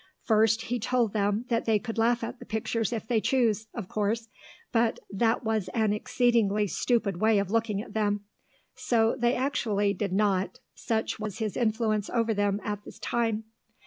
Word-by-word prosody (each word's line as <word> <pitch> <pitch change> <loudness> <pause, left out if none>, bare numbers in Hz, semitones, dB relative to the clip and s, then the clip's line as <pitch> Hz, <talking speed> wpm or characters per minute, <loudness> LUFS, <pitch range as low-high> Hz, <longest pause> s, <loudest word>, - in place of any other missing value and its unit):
First 220 0 +3
he 245 +1 -2
told 235 -1 +1
them 205 +2 0
that 230 -1 +1
they 220 -2 +3
could 225 +1 -5
laugh 235 +1 +2
at - - -5
the - - -10
pictures 220 +1 -1
if 225 -2 -4
they 225 -2 +2
choose, 220 -5 +1
of 225 -6 -6
course, 215 +3 -1 0.4
but 230 -1 +2
that 225 +5 +1
was 220 -4 -1
an 220 -3 +2
exceedingly 215 -2 +2
stupid 200 -1 0
way 220 -1 +4
of 200 -1 0
looking 220 -2 0
at - - -13
them; 205 -1 0 0.5
so 225 -2 +1
they 240 -1 +1
actually 215 -7 0
did 200 0 -3
not, 195 -1 +1
such 220 -1 -2
was 215 -1 -4
his 220 -3 -2
influence 220 -2 0
over 230 -2 +1
them 205 -1 +1
at 205 0 -4
this - - -12
time. 225 -2 -1
220 Hz, 175 wpm, -28 LUFS, 205-230 Hz, 0.5 s, way